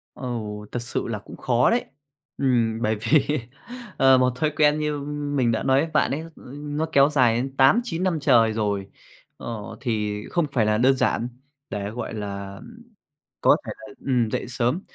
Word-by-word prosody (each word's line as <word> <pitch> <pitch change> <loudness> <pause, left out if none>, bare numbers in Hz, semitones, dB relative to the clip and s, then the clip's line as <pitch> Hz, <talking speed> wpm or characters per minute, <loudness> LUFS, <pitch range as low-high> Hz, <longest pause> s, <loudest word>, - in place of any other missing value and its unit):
Ừ, 130 - -7 0.5
thật - - -2
sự 120 - -3
là 110 -2 -3
cũng 105 - -12
khó 120 -1 +2
đấy. 240 +1 +1 0.5
Ừm, 115 -4 +1
bởi 110 0 +1
vì, 140 +6 +2 0.6
ờ, 135 -1 +6
một 125 0 +3
thói 155 +4 +1
quen 150 0 +4
như 150 -1 -1 0.4
mình 120 -4 +2
đã 110 - -1
nói 135 0 +3
với 160 +2 -2
bạn 150 - +2
ấy, 140 - -1
ơ, 165 +1 -9 0.3
nó 150 +2 -3
kéo 140 0 +6
dài 125 -6 +3
đến 135 +3 -3
8-9 170 - +3
năm 180 -4 0
trời 120 -6 +4
rồi, 100 -3 -2 0.5
ờ, 110 -4 -7
thì 105 -4 -2
không 170 -3 +1
phải 115 -5 +2
là 105 0 +2
đơn 130 +3 +4
giản 120 -2 0 0.4
để, 100 0 -3
gọi 115 +1 -5
là, 100 -2 -5
ừm, 230 - -13 0.6
có - - +6
thể - - -4
là, 135 0 -12
ừm, 125 -4 +2
dậy - - -2
sớm. 125 +7 0
125 Hz, 190 wpm, -24 LUFS, 110-145 Hz, 0.6 s, ờ